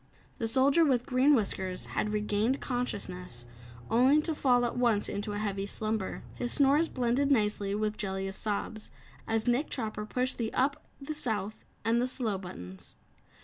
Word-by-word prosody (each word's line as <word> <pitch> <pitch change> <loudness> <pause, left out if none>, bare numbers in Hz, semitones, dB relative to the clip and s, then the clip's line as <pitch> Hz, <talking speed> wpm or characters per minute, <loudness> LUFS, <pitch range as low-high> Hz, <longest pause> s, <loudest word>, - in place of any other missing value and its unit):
The 225 - 0
Soldier 275 +7 +4
with 255 -5 +2
Green 265 +3 +4
Whiskers 190 -5 -1
had 210 - 0
regained 210 +4 0
consciousness, 180 - -3 0.4
only 255 +6 +5
to 325 - -1
fall 250 -4 +3
at 240 - -2
once 235 -4 +2
into 205 +1 -3
a - - -2
heavy 200 -1 -2
slumber. 215 -1 -3
His 245 - -3
snores 290 +4 +4
blended 255 +3 +1
nicely 210 -5 +1
with 215 0 -1
Jellia's 195 -1 -2
sobs, 215 +1 -3 0.4
as 225 -1 0
Nick 245 +5 +1
Chopper 215 -3 -4
pushed 255 +3 -1
the 225 -1 -1
"up," 280 +2 0
the 280 +2 -5
"South" 220 -8 -1 0.3
and 230 +1 +3
the 250 - +1
"slow" 230 -6 -1
buttons. 90 - -9
225 Hz, 160 wpm, -30 LUFS, 205-255 Hz, 0.4 s, only